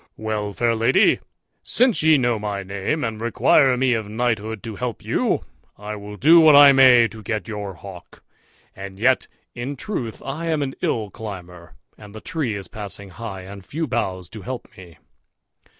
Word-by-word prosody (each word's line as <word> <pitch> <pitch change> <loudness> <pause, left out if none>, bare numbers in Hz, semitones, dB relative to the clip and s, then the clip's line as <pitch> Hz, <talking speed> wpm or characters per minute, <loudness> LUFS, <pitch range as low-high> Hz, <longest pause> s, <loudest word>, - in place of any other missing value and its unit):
"Well, 110 -1 -3
fair 115 +2 0
lady, 115 +1 +3 0.4
since 245 -2 +2
ye 155 -1 +5
know 120 -4 0
my 100 -2 -4
name, 100 +11 -3
and 110 -2 -4
require 125 +3 +3
me 130 0 +2
of 110 -3 -3
knighthood 110 -2 -2
to 110 -2 -6
help 120 -1 -5
you, - - 0 0.3
I 105 +1 -6
will 105 0 -9
do 160 - +6
what 155 -2 +7
I 145 -1 +9
may 130 -3 +6
to 110 - -11
get 110 0 -4
your 105 -3 -6
hawk; 95 0 -13 0.5
and 95 0 -9
yet 125 +5 +2 0.3
in 125 +4 -5
truth 125 - -5
I 155 +5 -4
am 155 -3 0
an 135 -1 -4
ill 105 -4 -1
climber, 90 -5 -9 0.2
and 105 0 -13
the - - -7
tree 145 - -3
is 100 -1 -7
passing 100 -1 -8
high, 100 -1 -7
and 100 +1 -10
few 160 - -4
boughs 95 - -3
to 110 - -10
help 125 +6 -6
me." 85 -3 -14
110 Hz, 180 wpm, -22 LUFS, 100-130 Hz, 0.5 s, I